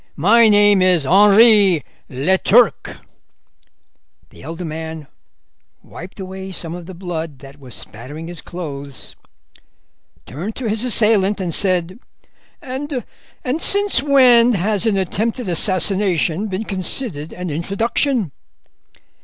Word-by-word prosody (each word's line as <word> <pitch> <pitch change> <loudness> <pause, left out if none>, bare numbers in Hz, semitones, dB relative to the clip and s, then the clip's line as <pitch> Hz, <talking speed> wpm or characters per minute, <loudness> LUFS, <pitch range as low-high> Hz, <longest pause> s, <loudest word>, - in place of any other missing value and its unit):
My 220 +8 +4
name 205 -2 +4
is 180 -5 +2
Henri 200 - +5 0.3
Leturc.' 190 - +1 1.3
The - - -16
elder 165 +5 -7
man 160 -1 -7 0.8
wiped 180 +4 -12
away 190 0 -8
some 170 -3 -5
of 175 -1 -9
the 190 - -10
blood 165 -5 -6
that 135 +2 -15
was 130 -4 -9
spattering 145 +9 -7
his 175 -2 -6
clothes, 140 -7 -8 1.1
turned 170 - -7
to 255 - -4
his 220 +2 -1
assailant, 210 -4 +2
and 175 -3 -3
said: 185 +1 0 0.6
'And 265 -1 -5 0.6
since 405 0 +2
when 250 -4 +4
has 205 +2 0
an 205 -3 +1
attempted 220 +5 -3
assassination 185 0 +1
been 195 +1 -4
considered 185 - -1
an 180 -2 -6
introduction? 205 - -1
190 Hz, 110 wpm, -18 LUFS, 165-220 Hz, 1.3 s, Henri